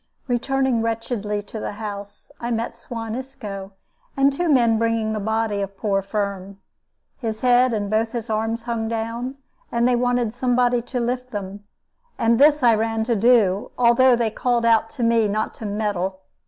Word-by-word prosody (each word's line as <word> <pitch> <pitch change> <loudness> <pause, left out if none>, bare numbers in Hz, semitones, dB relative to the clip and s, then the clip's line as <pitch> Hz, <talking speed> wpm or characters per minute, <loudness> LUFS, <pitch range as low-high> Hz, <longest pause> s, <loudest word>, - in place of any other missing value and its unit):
Returning 260 0 +1
wretchedly 225 -2 -2
to 220 - -8
the - - -4
house, 205 -1 -8
I 235 - -3
met 230 0 -2
Suan 230 -1 -6
Isco 215 -7 -7 0.4
and 275 0 +4
two 345 +4 -1
men 235 -6 +4
bringing 230 -1 0
the 215 - -2
body 220 0 -1
of 195 0 -5
poor 195 -2 0
Firm. 200 -1 -4 0.6
His 220 -3 -4
head 250 0 +4
and 210 -3 -1
both 220 +2 0
his 235 -1 -4
arms 225 +1 -1
hung 230 -2 -2
down, 230 +3 -3 0.4
and 235 +1 +2
they 250 - +3
wanted 245 -2 +1
somebody 245 -1 +2
to 245 +1 -4
lift 250 +1 -2
them; 205 -2 -6 0.5
and 230 +1 +2
this 295 0 +5
I 235 -1 +6
ran 225 0 0
to 235 +1 0
do, 210 -3 +3
although 245 +1 +5
they 230 -2 0
called 240 0 0
out 225 -1 +4
to 250 - -5
me 230 -1 +3
not 215 +2 -1
to 220 - -7
meddle. 200 -3 -2
230 Hz, 175 wpm, -22 LUFS, 210-245 Hz, 0.6 s, I